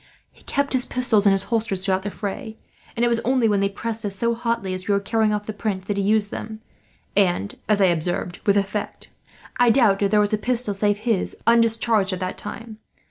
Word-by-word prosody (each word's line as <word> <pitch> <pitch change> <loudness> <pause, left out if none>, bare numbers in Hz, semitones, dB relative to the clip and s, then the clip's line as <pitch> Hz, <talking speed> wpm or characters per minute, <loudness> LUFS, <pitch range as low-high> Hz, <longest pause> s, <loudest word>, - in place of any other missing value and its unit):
He - - -23
kept 280 0 -1
his 255 -1 +1
pistols 225 -5 +2
in - - +6
his 195 0 +2
holsters 200 -4 0
throughout 190 -1 +1
the 205 - -4
fray; 220 +3 -6 0.4
and 235 - +1
it - - +3
was 235 -1 +1
only 255 -1 +2
when 205 -2 +2
they 200 0 +1
pressed 225 +2 -3
us 200 -2 -3
so 235 +4 0
hotly, 230 -4 -2
as 185 0 -6
we 200 - +3
were - - +2
carrying 215 +1 +1
off 210 0 -2
the 215 - -5
Prince, 200 -3 -3
that 205 - -2
he 200 - 0
used 210 +1 +1
them; 220 0 -6 0.6
and, 175 - +1 0.2
as 210 -1 +3
I 195 - +5
observed, 175 0 -1
with 200 0 +4
effect. 200 +1 -3 0.5
I 245 -1 +5
doubt 220 -5 +4
if 200 - +2
there 210 +1 +3
was 210 0 +1
a 215 - +1
pistol 240 -2 0
save 205 +1 +1
his 215 -2 -1
undischarged, 230 -3 +3
at 185 - -4
that 185 -1 -4
time. 225 0 -8
210 Hz, 230 wpm, -22 LUFS, 195-230 Hz, 0.6 s, in